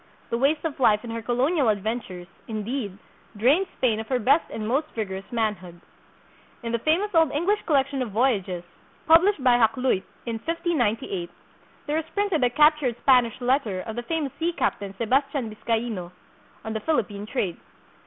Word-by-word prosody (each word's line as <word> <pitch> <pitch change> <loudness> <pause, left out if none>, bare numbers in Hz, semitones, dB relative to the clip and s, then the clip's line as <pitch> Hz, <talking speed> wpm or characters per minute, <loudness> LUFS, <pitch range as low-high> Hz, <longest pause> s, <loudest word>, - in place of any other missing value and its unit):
The 235 - +1
waste 295 +5 +1
of 295 -3 -3
life 215 -4 +4
in 235 - -6
her 230 0 -4
colonial 255 +4 +1
adventures, 205 -3 -3 0.2
indeed, 215 -2 -4 0.4
drained 285 - +3
Spain 225 -4 +1
of 220 - -6
her 260 - +1
best 275 +7 +3
and 215 -1 -5
most 275 +7 +1
vigorous 195 -1 -5
manhood. 205 -7 -2 0.8
In 230 - -3
the 235 - 0
famous 355 - +1
old 325 -4 +4
English 370 +8 +1
collection 275 -3 +1
of 245 - -2
voyages, 200 -6 0 0.4
published 330 -1 +5
by 250 -2 +5
Hakluyt 240 -2 +2 0.2
in 230 -2 -3
1598, 245 - -1 0.6
there 300 +1 -1
is 320 0 -7
printed 400 -8 +1
a 245 - +4
captured 300 -2 +3
Spanish 250 -4 +4
let 260 +3 +2
ter 190 -4 -4
of 220 +2 -6
the 240 - -2
famous 295 +1 -2
sea 335 +1 +1
captain, 200 - -2
Sebastian 265 0 0
Biscaino, 220 -4 -3 0.5
on 220 - -3
the 220 - -2
Philippine 210 -6 -1
trade. 200 -9 -2
245 Hz, 165 wpm, -25 LUFS, 215-295 Hz, 0.8 s, published